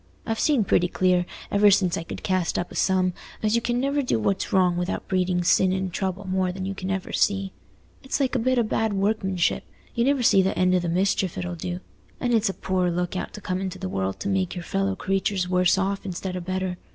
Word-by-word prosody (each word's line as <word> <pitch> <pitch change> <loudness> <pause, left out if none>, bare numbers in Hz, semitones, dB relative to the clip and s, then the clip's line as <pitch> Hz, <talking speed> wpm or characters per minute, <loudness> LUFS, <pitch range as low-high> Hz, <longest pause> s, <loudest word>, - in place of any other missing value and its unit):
I've 225 0 -2
seen 285 -8 +3
pretty 180 -2 +2
clear, 180 -1 +2 0.2
ever 205 0 +5
since 185 -3 +3
I - - -3
could 165 - -8
cast 185 -3 0
up 175 - -3
a - - -9
sum, 185 -1 +2 0.3
as 215 0 +2
you 235 - +2
can 240 +1 0
never 280 +2 +1
do 250 - 0
what's 190 - -1
wrong 180 -2 +3
without 175 +1 -3
breeding 180 -2 +1
sin 185 +2 +4
and 190 -1 -2
trouble 190 +1 -3
more 185 -1 0
than 185 +1 -5
you 195 - -2
can 190 -1 -5
ever 195 -1 -3
see. 195 -1 +1 0.5
It's 265 - -2
like 265 -2 +1
a 255 - +2
bit 255 +2 +1
o' 240 - +4
bad 220 0 0
workmanship—you 195 +2 -1
never 275 0 +2
see 195 -4 +6
th' 190 +1 0
end 185 0 +3
o' 180 - +4
the 175 -1 -2
mischief 185 0 0
it'll 90 -1 -3
do. 90 +1 -5 0.4
And 245 -1 0
it's 220 -2 +3
a 195 - -4
poor 185 -1 0
look 175 +1 -2
out 185 - -3
to 210 - -8
come 185 0 -2
into 190 -2 -4
the 95 - -4
world 95 0 -2
to - - -3
make 190 -2 0
your 175 - -5
fellow 195 +2 -1
creatures 195 -1 -1
worse 180 0 +3
off 195 +1 -1
instead 185 0 -4
o' - - -2
better. 185 0 -3
190 Hz, 235 wpm, -25 LUFS, 180-200 Hz, 0.5 s, see